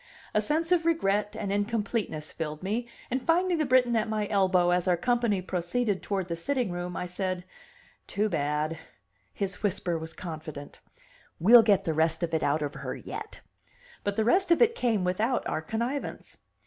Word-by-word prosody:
A 215 Hz, -, +3 dB
sense 320 Hz, -, 0 dB
of 350 Hz, -2 st, +4 dB
regret 210 Hz, -11 st, +1 dB
and 200 Hz, -2 st, -2 dB
incompleteness 205 Hz, -6 st, -1 dB
filled 155 Hz, 0 st, -5 dB
me, 225 Hz, +5 st, -2 dB, 0.2 s
and 260 Hz, +1 st, 0 dB
finding 345 Hz, +3 st, +2 dB
the 305 Hz, -, +1 dB
Briton 250 Hz, -2 st, +4 dB
at 220 Hz, -1 st, +1 dB
my 215 Hz, -1 st, -1 dB
elbow 185 Hz, -3 st, +3 dB
as 180 Hz, +1 st, +1 dB
our 180 Hz, -1 st, +3 dB
company 235 Hz, -1 st, +1 dB
proceeded 185 Hz, +4 st, -1 dB
toward 195 Hz, -3 st, -2 dB
the 170 Hz, -, -2 dB
sitting 245 Hz, +4 st, -1 dB
room, 175 Hz, 0 st, -4 dB
I -, -, -2 dB
said: 180 Hz, 0 st, -3 dB, 0.6 s
"Too 210 Hz, +1 st, 0 dB
bad!" 150 Hz, -2 st, -1 dB, 0.5 s
His 195 Hz, -1 st, -4 dB
whisper 185 Hz, -5 st, 0 dB
was 160 Hz, 0 st, -7 dB
confident. 155 Hz, -4 st, -8 dB, 0.6 s
"We'll 230 Hz, +7 st, +8 dB
get 205 Hz, -3 st, +3 dB
the 165 Hz, -, -1 dB
rest 160 Hz, +2 st, +1 dB
of 165 Hz, -1 st, -2 dB
it 160 Hz, -, +1 dB
out 150 Hz, +2 st, +1 dB
of 145 Hz, -, -3 dB
her -, -, -5 dB
yet." -, -, -8 dB, 0.6 s
But 205 Hz, 0 st, -1 dB
the 220 Hz, 0 st, +1 dB
rest 370 Hz, +9 st, +3 dB
of 340 Hz, -, +5 dB
it 470 Hz, -1 st, +5 dB
came 230 Hz, -, 0 dB
without 215 Hz, +8 st, 0 dB
our -, -, -1 dB
connivance. 235 Hz, -, -4 dB
200 Hz, 180 wpm, -28 LUFS, 175-240 Hz, 0.6 s, We'll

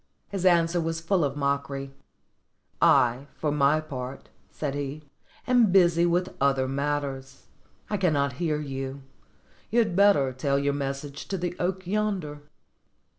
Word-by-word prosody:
His 190 Hz, -2 st, 0 dB
answer 170 Hz, -1 st, +3 dB
was 165 Hz, 0 st, -2 dB
full 170 Hz, +1 st, +1 dB
of 140 Hz, -1 st, -1 dB
mockery: 140 Hz, -1 st, -2 dB, 0.9 s
"I, 125 Hz, +3 st, +4 dB
for 150 Hz, -, -1 dB
my 145 Hz, +1 st, +3 dB
part," 135 Hz, -4 st, -7 dB, 0.2 s
said 145 Hz, -3 st, -4 dB
he, 145 Hz, +1 st, -5 dB, 0.4 s
"am 245 Hz, -5 st, +4 dB
busy 175 Hz, -2 st, +4 dB
with 180 Hz, +2 st, 0 dB
other 135 Hz, -1 st, +2 dB
matters: 135 Hz, -1 st, -3 dB, 0.4 s
I 210 Hz, -, -1 dB
cannot 145 Hz, -8 st, +1 dB
hear 155 Hz, -3 st, 0 dB
you; 135 Hz, -1 st, -5 dB, 0.7 s
you 230 Hz, -, -1 dB
had 220 Hz, -7 st, +2 dB
better 185 Hz, -10 st, +4 dB
tell 140 Hz, +2 st, 0 dB
your 140 Hz, 0 st, +1 dB
message 140 Hz, +1 st, -5 dB
to 195 Hz, -, -2 dB
the 175 Hz, 0 st, -3 dB
oak 185 Hz, +1 st, -2 dB
yonder." 185 Hz, -7 st, -2 dB
145 Hz, 140 wpm, -26 LUFS, 140-175 Hz, 0.9 s, I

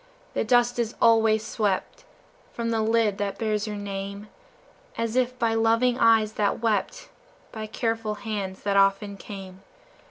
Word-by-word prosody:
the -, -, 0 dB
dust 240 Hz, +1 st, +2 dB
is 235 Hz, 0 st, -1 dB
always 220 Hz, -1 st, +4 dB
swept 210 Hz, -, -2 dB, 0.5 s
From 230 Hz, -1 st, -2 dB
the 225 Hz, -1 st, +1 dB
lid 220 Hz, -2 st, +1 dB
that 200 Hz, -1 st, -2 dB
bears 215 Hz, -1 st, -1 dB
your 210 Hz, -, -4 dB
name, 200 Hz, 0 st, -6 dB, 0.7 s
As 230 Hz, 0 st, -2 dB
if 255 Hz, 0 st, +1 dB
by 230 Hz, -2 st, +1 dB
loving 230 Hz, +2 st, +2 dB
eyes 220 Hz, -2 st, +4 dB
that 205 Hz, -2 st, 0 dB
wept, 220 Hz, -4 st, -1 dB, 0.4 s
By 220 Hz, -1 st, -6 dB
careful 225 Hz, -1 st, -2 dB
hands 205 Hz, -3 st, -5 dB
that 200 Hz, -1 st, +1 dB
often 195 Hz, +1 st, +2 dB
came. 195 Hz, -2 st, -10 dB
220 Hz, 150 wpm, -25 LUFS, 205-230 Hz, 0.7 s, always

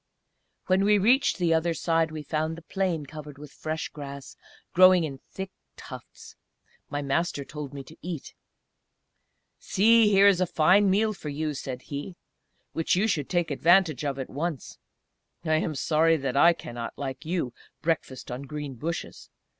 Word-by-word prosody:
When 190 Hz, +1 st, +3 dB
we 210 Hz, +1 st, +5 dB
reached 245 Hz, +8 st, +3 dB
the 175 Hz, -3 st, +2 dB
other 165 Hz, +1 st, +1 dB
side 165 Hz, -1 st, +1 dB
we 155 Hz, -1 st, -6 dB
found 155 Hz, +1 st, -2 dB
the 170 Hz, -, -11 dB
plain 175 Hz, -4 st, -1 dB
covered 150 Hz, -1 st, -10 dB
with 145 Hz, -1 st, -11 dB
fresh 155 Hz, 0 st, -4 dB
grass, 140 Hz, -2 st, -9 dB, 0.4 s
growing 185 Hz, -1 st, +7 dB
in 140 Hz, -4 st, -5 dB
thick 190 Hz, 0 st, -6 dB, 0.3 s
tufts. -, -, -11 dB, 0.5 s
My 145 Hz, 0 st, -3 dB
Master 140 Hz, 0 st, -1 dB
told 150 Hz, -2 st, -7 dB
me 140 Hz, -1 st, -7 dB
to 155 Hz, -, -14 dB
eat. 170 Hz, -4 st, -6 dB, 1.3 s
"See! 225 Hz, +1 st, +4 dB
there 200 Hz, 0 st, +6 dB
is 190 Hz, -2 st, +4 dB
a 185 Hz, -, +2 dB
fine 190 Hz, +6 st, +4 dB
meal 215 Hz, +3 st, +2 dB
for 155 Hz, -6 st, -7 dB
you," 150 Hz, +1 st, -2 dB
said 130 Hz, -2 st, -6 dB
he, 145 Hz, +6 st, -6 dB, 0.6 s
"which 165 Hz, -, +1 dB
you 190 Hz, +4 st, +2 dB
should 155 Hz, -10 st, -1 dB
take 175 Hz, -3 st, 0 dB
advantage 165 Hz, -1 st, +3 dB
of 140 Hz, -2 st, -2 dB
at 135 Hz, -, -5 dB
once. 155 Hz, -1 st, -4 dB, 0.7 s
I 155 Hz, -1 st, +3 dB
am 155 Hz, -1 st, -2 dB
sorry 160 Hz, +3 st, +3 dB
that 135 Hz, -3 st, -3 dB
I 170 Hz, +5 st, +6 dB
cannot, 120 Hz, -7 st, -7 dB
like 135 Hz, -2 st, -5 dB
you, 160 Hz, -7 st, -2 dB, 0.3 s
breakfast 150 Hz, -6 st, -2 dB
on 125 Hz, +2 st, -5 dB
green 145 Hz, 0 st, -6 dB
bushes!... 160 Hz, +7 st, -5 dB
160 Hz, 165 wpm, -27 LUFS, 140-180 Hz, 1.3 s, growing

